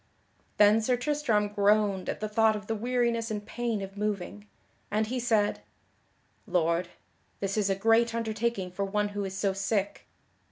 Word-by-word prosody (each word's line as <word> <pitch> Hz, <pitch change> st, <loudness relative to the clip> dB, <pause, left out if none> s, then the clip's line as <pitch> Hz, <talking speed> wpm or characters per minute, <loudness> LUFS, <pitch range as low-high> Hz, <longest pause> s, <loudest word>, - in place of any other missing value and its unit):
Then 210 Hz, +2 st, +6 dB
Sir 245 Hz, +3 st, +1 dB
Tristram 240 Hz, -6 st, 0 dB
groaned 205 Hz, -1 st, +2 dB
at -, -, -4 dB
the 215 Hz, -, -1 dB
thought 220 Hz, 0 st, +3 dB
of 210 Hz, 0 st, -6 dB
the 225 Hz, -, -2 dB
weariness 235 Hz, 0 st, 0 dB
and 210 Hz, -1 st, -4 dB
pain 230 Hz, -4 st, -2 dB
of 195 Hz, 0 st, -8 dB
moving, 210 Hz, 0 st, -3 dB, 0.4 s
and 215 Hz, +1 st, +1 dB
he 250 Hz, +4 st, -3 dB
said: 220 Hz, -4 st, +1 dB, 0.9 s
"Lord, 170 Hz, 0 st, +1 dB, 0.5 s
this 195 Hz, 0 st, -2 dB
is 210 Hz, -2 st, +1 dB
a 195 Hz, -, +2 dB
great 225 Hz, +3 st, +3 dB
undertaking 220 Hz, -4 st, -2 dB
for 200 Hz, +2 st, -3 dB
one 205 Hz, +1 st, 0 dB
who 205 Hz, 0 st, -4 dB
is 190 Hz, 0 st, -5 dB
so 195 Hz, -1 st, +1 dB
sick. 195 Hz, +1 st, -2 dB
210 Hz, 165 wpm, -28 LUFS, 200-225 Hz, 0.9 s, Then